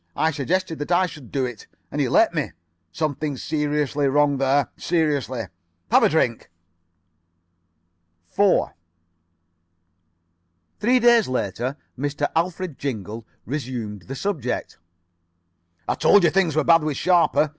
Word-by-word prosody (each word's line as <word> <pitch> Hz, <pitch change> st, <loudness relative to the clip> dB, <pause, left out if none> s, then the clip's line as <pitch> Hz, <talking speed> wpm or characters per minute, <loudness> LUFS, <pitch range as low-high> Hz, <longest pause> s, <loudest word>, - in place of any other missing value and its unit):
I 160 Hz, +1 st, +1 dB
suggested 160 Hz, +3 st, -2 dB
that 145 Hz, +4 st, -5 dB
I 180 Hz, +2 st, +4 dB
should 145 Hz, -8 st, -10 dB
do 135 Hz, -2 st, 0 dB
it, 120 Hz, -4 st, -8 dB, 0.2 s
and -, -, -1 dB
he -, -, +1 dB
let -, -, +4 dB
me. -, -, -2 dB, 0.4 s
Something 150 Hz, -, -2 dB
seriously 150 Hz, -1 st, -1 dB
wrong 145 Hz, 0 st, +2 dB
there. 135 Hz, +1 st, +2 dB
Seriously. 145 Hz, -8 st, -1 dB, 0.5 s
Have -, -, +6 dB
a -, -, +4 dB
drink." 125 Hz, -7 st, 0 dB, 1.8 s
4 200 Hz, -2 st, +2 dB, 2.1 s
Three 250 Hz, +4 st, +3 dB
days 235 Hz, -2 st, +5 dB
later 125 Hz, +3 st, -2 dB, 0.2 s
Mr. 145 Hz, +2 st, -2 dB
Alfred 170 Hz, -1 st, -2 dB
Jingle 115 Hz, -4 st, -5 dB, 0.2 s
resumed 120 Hz, -7 st, -5 dB
the 135 Hz, -, -5 dB
subject. 145 Hz, -10 st, -3 dB, 1.1 s
"I -, -, +1 dB
told 205 Hz, -, +4 dB
you 170 Hz, -, +4 dB
things 175 Hz, -4 st, +1 dB
were 155 Hz, -, +2 dB
bad 165 Hz, +2 st, +5 dB
with 150 Hz, -3 st, -2 dB
Sharper. 175 Hz, -4 st, +3 dB
145 Hz, 125 wpm, -23 LUFS, 130-165 Hz, 2.1 s, Have